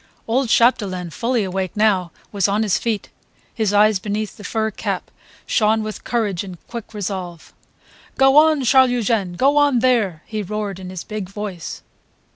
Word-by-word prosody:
Old 245 +2 +1
Chapdelaine, 195 -8 +2
fully 235 +4 0
awake 190 0 -3
now, 195 -5 +2 0.2
was 200 -2 +1
on 205 +2 +1
his 205 -4 +1
feet; 225 -3 -2 0.4
his 215 -3 0
eyes 205 -1 +4
beneath 210 +2 -3
the 210 - -12
fur 220 +1 -1
cap - - -4 0.3
shone 220 -1 +2
with 215 0 -6
courage 210 -7 -1
and 185 -3 -9
quick 230 -2 -8
resolve. 185 -4 -5 0.6
"Go 270 0 +5
on, 305 -2 +5
Charles 260 +1 +5
Eugene! 225 -6 0
Go 275 +10 +2
on 290 -3 +4
there!" 230 -10 +1
he 215 -1 -4
roared 205 -1 -4
in 185 -1 -8
his 185 -2 -6
big 210 -4 -6
voice. 195 -4 -6
210 Hz, 165 wpm, -20 LUFS, 190-235 Hz, 0.6 s, Go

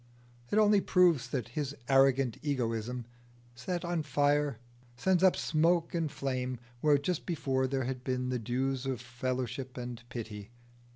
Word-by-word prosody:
It - - +1
only 210 -2 +5
proves 175 -11 +4
that 120 -2 -3
his 145 +2 -3
arrogant 135 -2 +4
egoism, 120 -4 -2 0.5
set 175 +9 -4
on 170 -1 0
fire, 145 -2 +1 0.4
sends 180 +8 +2
up 190 -1 +6
smoke 165 +2 +2
and 165 -3 -1
flame 130 -3 -2 0.2
where 150 +2 +4
just 150 +4 -2
before 135 -6 0
there 135 0 -1
had 125 0 -4
been 125 -1 -1
the 125 -1 -1
dews 130 +3 -1
of 130 -3 -2
fellowship 125 +1 -4
and 120 -1 -5
pity. 110 -3 -6
135 Hz, 150 wpm, -31 LUFS, 125-150 Hz, 0.5 s, up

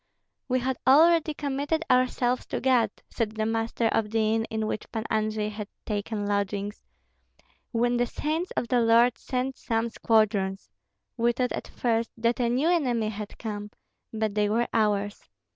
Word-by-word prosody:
"We 255 0 +1
had 260 +1 -2
already 315 +3 +5
committed 290 +3 -1
ourselves 250 0 +2
to - - -2
God," 245 -4 +3 0.2
said 220 -3 -2
the 220 0 -1
master 225 +1 -1
of 220 -1 0
the 220 0 +1
inn 225 0 +1
in 220 -1 -3
which 215 - -4
Pan 220 -2 -3
Andrei 215 -1 0
had 210 -1 -6 0.2
taken 210 0 -2
lodgings, 205 0 -2 0.9
"when 240 +1 +1
the 245 0 +1
saints 315 +8 -2
of 235 - 0
the 250 - +3
Lord 230 +1 +4
sent 255 0 -3
some 225 0 -1
squadrons. 200 - +1 0.5
We 235 +1 +2
thought 250 +1 -1
at - - -4
first 230 -1 0
that 235 +2 +1
a 240 -1 +2
new 265 +7 +2
enemy 245 -11 +1
had 210 -1 -7
come, 210 -2 -5 0.4
but 220 -2 -1
they 210 0 +1
were 230 +3 +1
ours. 205 - 0
230 Hz, 165 wpm, -27 LUFS, 215-250 Hz, 0.9 s, already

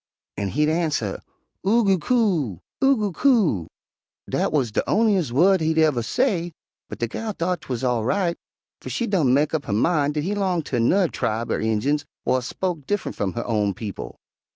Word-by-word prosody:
an' 100 - -2
he'd 150 +9 +1
arnser, 155 - -1 0.4
'Oo 225 +5 +3
goo 195 -3 +3
coo, 170 - +1 0.2
Oo 270 0 +5
goo 210 -2 -1
coo.' 185 - +2 0.6
Dat - - 0
wuz 135 -7 +1
de - - +1
on'ies 200 - +2
wu'd 180 +8 +4
he 160 0 +1
uver 155 -6 +3
say, 175 - 0 0.4
but - - -6
de 120 - -1
gal 215 - -4
thought 180 0 -2
'twuz 125 -1 -4
all 120 -3 +1
right, 175 - 0 0.5
fer - - -7
she 240 - -1
done 175 - +2
mek 145 +4 +2
up 155 -3 -1
her - - -2
min' 145 +5 +2
dat 150 -1 -1
he 195 +5 -1
'longed 185 -6 0
ter 120 - -1
nu'rr 180 +11 +3
tribe 115 +2 -2
er - - 0
Injuns 110 +7 0 0.2
whar 130 - +2
spoke 165 +3 -4
diff'nt 205 -1 -2
f'um 95 -2 -2
her 120 - -3
own 105 -4 0
people. 105 -3 -7
155 Hz, 190 wpm, -23 LUFS, 120-195 Hz, 0.6 s, Oo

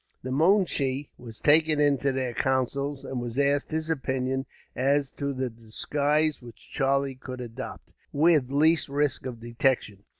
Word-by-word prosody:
The 130 - -4
moonshee 145 -4 +2
was 115 -3 -10
taken 155 0 +4
into 140 -2 +2
their 130 -2 -2
counsels, 135 +2 -1
and 130 -2 -4
was 120 0 -5
asked 140 0 +2
his 160 0 -2
opinion 130 -3 -1 0.3
as 140 +1 +1
to 140 0 -3
the 130 -2 -3
disguise 145 +7 0
which 120 -2 -14
Charlie 135 0 +1
could 130 0 -8
adopt, 120 +1 -8 0.2
with 150 -3 +3
least 155 +3 +3
risk 145 -2 0
of 120 -3 -7
detection. 115 -3 -1
135 Hz, 145 wpm, -27 LUFS, 130-145 Hz, 0.3 s, taken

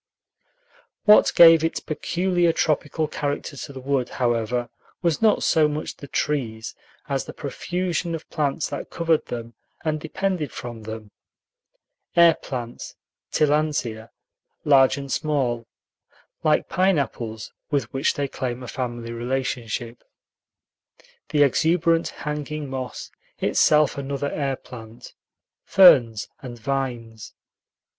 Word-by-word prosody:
What 210 0 +7
gave 165 -1 +8
its 165 - 0
peculiar 175 +2 0
tropical 155 0 0
character 145 0 -3
to 140 - -7
the 135 - -8
wood, 130 -1 -1
however, 120 -1 -1 0.3
was 170 -3 +1
not 220 -2 +3
so 160 -2 +4
much 150 +1 -4
the 140 - -10
trees 115 -8 -2 0.3
as - - -1
the - - -8
profusion 175 -1 -3
of 160 - -9
plants 150 0 -1
that 140 - -6
covered 165 -2 0
them 115 -1 -6 0.3
and 155 -1 0
depended 180 -3 -2
from 120 -2 -7
them: 110 -1 -8 1.0
air 170 -1 +7
plants 120 -6 -7 0.4
(Tillandsia), 145 -7 0 0.6
large 135 -1 +5
and 140 -1 -6
small, 130 -7 -1 0.8
like - - +2
pineapples, 140 - -1 0.2
with 140 -6 -1
which 135 +2 +1
they 145 -1 -1
claim 125 -1 -4
a - - -7
family 120 -2 -4
relationship, 120 -1 -3 1.3
the 145 -1 +4
exuberant 165 +4 +2
hanging 150 0 -5
moss, 130 -1 -6 0.3
itself 150 -2 +3
another 140 +1 -3
air 140 -2 -1
plant, 115 -3 -12 0.5
ferns, 120 - +6
and 125 -3 -8
vines. 120 -3 -4
140 Hz, 115 wpm, -23 LUFS, 120-155 Hz, 1.3 s, gave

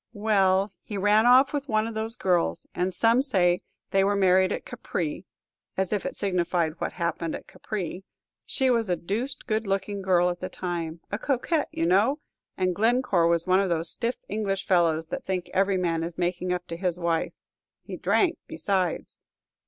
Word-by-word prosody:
"Well, 200 -2 +2
he 205 - -6
ran 210 +3 +4
off 260 +3 +6
with 285 -1 -3
one 215 -1 +2
of 230 - -5
those 220 +1 -3
girls, 180 -6 0
and 180 +1 -1
some 230 +7 +3
say 180 -10 +2 0.3
they 195 0 +3
were 200 +1 +2
married 190 -1 +4
at - - -3
Capri, 170 +2 -4 0.5
as 190 +1 0
if 205 - -1
it - - -5
signified 175 -4 0
what - - -2
happened 170 -2 -2
at - - -8
Capri! 190 -3 -5 0.4
She 260 -1 +1
was 230 -4 +1
a 180 - +2
deuced 225 - -4
good 220 -2 -1
looking 195 +1 -1
girl 180 -2 +3
at 175 - -7
the 185 - -4
time, 170 -2 -4
a 205 - -2
coquette, 290 +5 0
you 165 - -1
know, 205 - +3 0.4
and 185 -1 +1
Glencore 220 -4 +2
was 170 0 +2
one 185 0 +4
of 195 -1 +1
those 165 -1 +1
stiff 240 +1 -1
English 195 -2 -2
fellows 165 -3 +2
that - - -4
think 185 -2 -3
every 195 0 +2
man 170 -3 0
is 165 0 -4
making 180 +1 -1
up 180 0 -2
to 165 - -4
his 175 -1 0
wife; 170 -2 -1 0.5
he - - -7
drank 360 -4 +1
besides." 195 - -2
190 Hz, 185 wpm, -26 LUFS, 175-215 Hz, 0.5 s, off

